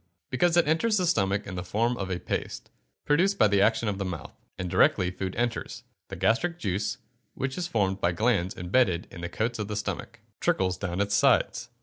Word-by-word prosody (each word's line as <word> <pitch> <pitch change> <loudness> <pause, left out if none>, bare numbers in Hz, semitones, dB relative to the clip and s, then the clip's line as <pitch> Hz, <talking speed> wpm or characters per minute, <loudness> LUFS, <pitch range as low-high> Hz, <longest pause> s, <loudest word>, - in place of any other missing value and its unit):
_ - - -43 0.3
Because 170 +7 +2
it 170 - +4
enters 210 +8 +2
the 185 - +1
stomach 100 - +1
in 100 - -7
the 90 -1 -4
form 115 +6 0
of 95 -5 -4
a 90 -1 -2
paste, - - -4 0.3
produced 180 +7 +3
by 110 - +5
the 100 -1 +3
action 110 +1 +2
of 100 -1 -2
the - - -1
mouth; 90 -5 -6 0.2
and 90 - -3
directly 90 +1 +3
food 95 0 -4
enters, 120 0 -2 0.2
the - - -7
gastric 115 - +1
juice, 100 - -2 0.4
which 135 0 -3
is 180 -1 -2
formed 100 - 0
by 85 - +2
glands 100 -2 0
embedded 90 -1 +1
in 85 - -9
the 85 - -4
coats 115 +1 -2
of 105 - -2
the 105 - -4
stomach, 105 - -4 0.2
trickles 90 -1 +1
down 95 -1 -2
its 100 0 0
sides. - - +2
105 Hz, 215 wpm, -27 LUFS, 95-125 Hz, 0.4 s, by